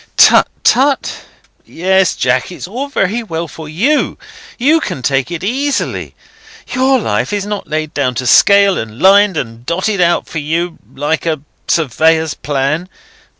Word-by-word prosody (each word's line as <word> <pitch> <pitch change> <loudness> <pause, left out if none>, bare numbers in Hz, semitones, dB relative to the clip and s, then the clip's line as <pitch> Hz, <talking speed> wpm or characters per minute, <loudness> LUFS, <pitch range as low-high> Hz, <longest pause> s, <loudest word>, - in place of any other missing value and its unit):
"Tut, - - +6 0.2
tut? 275 +2 +2 0.5
Yes, 190 +1 +1
Jack, 125 +5 0
it's 175 - -8
all 250 +9 -4
very 230 -4 -1
well 170 -6 -4
for 160 -1 -10
you. 245 - 0 0.4
You 295 +6 +3
can 135 - -5
take 135 +2 0
it 175 0 -5
easily. 270 +7 -2 0.6
Your 260 +1 +3
life 225 - -1
is 205 -1 -2
not 205 -1 -5
laid 155 -1 -3
down 130 -3 -1
to 125 - -3
scale, 200 +7 +5
and 110 +1 -7
lined 195 -1 +5
and 115 -3 -5
dotted 185 - -1
out 175 0 +2
for 160 - -5
you, 165 +3 -2 0.2
like 150 +4 -2
a 155 -3 -1 0.3
surveyor's 160 +1 +1
plan. 145 +5 -2
170 Hz, 150 wpm, -14 LUFS, 150-205 Hz, 0.6 s, Tut